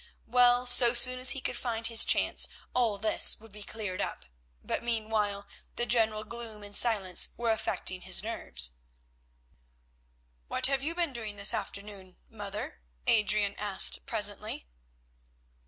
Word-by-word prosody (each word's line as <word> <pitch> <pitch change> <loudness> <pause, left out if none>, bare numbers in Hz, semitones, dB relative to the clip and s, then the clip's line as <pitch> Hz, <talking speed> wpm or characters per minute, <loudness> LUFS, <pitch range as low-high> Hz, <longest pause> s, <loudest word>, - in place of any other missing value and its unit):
Well, 245 +1 +2
so 245 -1 +6
soon 255 +1 +4
as 255 0 +5
he 270 - -2
could - - -4
find 230 -2 -5
his 230 -1 +6
chance - - +1 0.3
all 235 -5 -1
this 215 +2 +3
would 225 0 -17
be 210 +1 -13
cleared 205 -3 -7
up, - - -6 0.4
but - - -3
meanwhile 215 -3 -3 0.3
the 240 - -2
general 220 -2 0
gloom 225 -1 -8
and 205 0 -4
silence 200 -7 +2
were 235 -1 -1
affecting 185 -4 -2
his 185 +1 +1
nerves. 65 - -3 1.8
"What - - -2
have 275 0 +3
you 320 +4 -4
been 340 -5 -2
doing 220 -3 -6
this 200 +1 +2
afternoon, 200 -2 -8
mother?" 205 - -9 0.2
Adrian 210 -2 +1
asked 205 -2 +5
presently. 210 - -2
220 Hz, 140 wpm, -28 LUFS, 205-235 Hz, 1.8 s, so